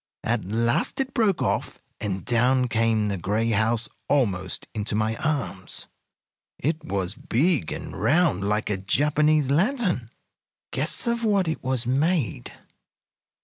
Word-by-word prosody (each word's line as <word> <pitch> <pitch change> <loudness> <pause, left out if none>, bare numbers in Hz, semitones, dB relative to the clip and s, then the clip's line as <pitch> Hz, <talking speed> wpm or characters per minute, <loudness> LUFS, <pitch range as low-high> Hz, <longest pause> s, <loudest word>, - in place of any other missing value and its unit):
At 115 -3 0
last 115 - 0
it 265 -1 -1
broke 215 -6 +2
off, - - -1 0.2
and 95 -3 -3
down 125 +2 +3
came 115 -2 +2
the 100 -3 -2
gray 110 +6 0
house 110 +2 +2 0.2
almost 95 -10 0
into 105 -1 -2
my 110 +1 0
arms. 145 - -3 0.7
"It 155 +2 -1
was 100 - -2
big 140 - 0
and - - -6
round, 155 - +2
like 105 0 0
a 100 - 0
Japanese 150 +7 +2
lantern. 180 - +1 0.6
Guess 150 +4 0
of 235 0 0
what 200 -5 +2
it 160 - -3
was 130 -2 -1
made? 135 - 0
125 Hz, 135 wpm, -25 LUFS, 110-155 Hz, 0.7 s, down